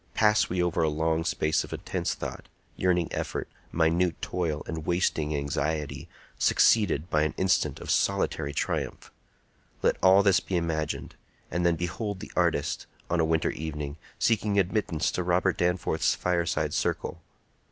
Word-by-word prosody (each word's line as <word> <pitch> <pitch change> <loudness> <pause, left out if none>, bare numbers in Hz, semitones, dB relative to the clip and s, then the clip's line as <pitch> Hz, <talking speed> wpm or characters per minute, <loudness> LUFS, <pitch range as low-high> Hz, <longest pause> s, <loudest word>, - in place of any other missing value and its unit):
Pass 105 -1 +4
we 90 0 +1
over 85 -1 0
a 80 - +3
long 80 +1 0
space 80 -2 +1
of - - -10
intense - - -2
thought, - - -7 0.3
yearning 90 -3 +1
effort, - - -3 0.2
minute 85 +2 +2
toil, 80 -4 -2
and 80 -1 -5
wasting 80 -3 0
anxiety, 70 +1 -2 0.3
succeeded 95 -8 +3
by 75 - +3
an 75 0 0
instant 95 0 +1
of - - -4
solitary 70 - +1
triumph: 70 - -3 0.7
let - - +3
all 95 +2 +6
this 100 -2 +5
be 95 - -2
imagined; 80 -2 -2 0.4
and 85 +1 +1
then 85 - +3
behold 95 +4 -3
the - - -9
artist, - - 0 0.2
on 85 - +2
a 80 - +3
winter 80 0 +1
evening, 75 -2 -5 0.2
seeking 105 -2 +1
admittance 95 -4 +1
to - - -2
Robert 90 +1 +2
Danforth's 90 +1 +1
fireside 85 -2 0
circle. - - -2
85 Hz, 150 wpm, -27 LUFS, 80-90 Hz, 0.7 s, all